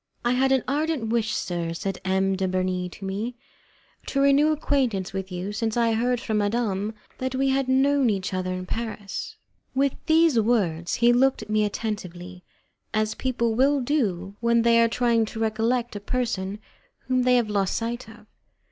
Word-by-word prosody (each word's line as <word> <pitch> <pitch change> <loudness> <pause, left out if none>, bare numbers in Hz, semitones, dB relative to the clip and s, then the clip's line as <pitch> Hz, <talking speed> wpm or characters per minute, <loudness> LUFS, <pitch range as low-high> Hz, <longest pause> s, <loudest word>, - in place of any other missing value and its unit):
"I 240 - +3
had 265 +2 +2
an 265 -2 +3
ardent 290 -4 -1
wish, 225 -2 +1
sir," 170 -2 -2
said 195 +2 -4
M. 190 0 +1
de 190 0 -1
Bernis 185 -1 -1
to 195 - -9
me, 210 +6 -3 0.7
"to 275 - -1
renew 280 +2 +4
acquaintance 255 -11 0
with 190 0 -4
you, 180 +3 -4
since 225 +1 -2
I 230 -1 +3
heard 245 +2 +1
from 220 -4 -1
madame 210 -1 -1 0.2
that 260 0 -2
we 270 +1 +1
had 270 0 +1
known 270 0 +3
each 190 -3 -2
other 185 0 -2
in 185 0 -4
Paris." 215 -1 -5 0.4
With 275 0 +2
these 320 -5 +4
words 190 -8 +1
he 240 0 +4
looked 260 -1 +3
at 215 - -9
me 215 0 +3
attentively, 185 -4 -5 0.5
as 215 0 +1
people 235 -2 -1
will 275 +5 +3
do 200 - -1
when 235 0 +3
they 230 0 +5
are 230 - +5
trying 235 -1 +2
to 220 +1 -7
recollect 225 +2 0
a - - -3
person 205 -3 -2 0.4
whom 255 -1 0
they 250 0 +4
have 235 -4 +1
lost 195 -2 0
sight 235 0 -3
of. 220 -1 -15
225 Hz, 180 wpm, -25 LUFS, 195-255 Hz, 0.7 s, they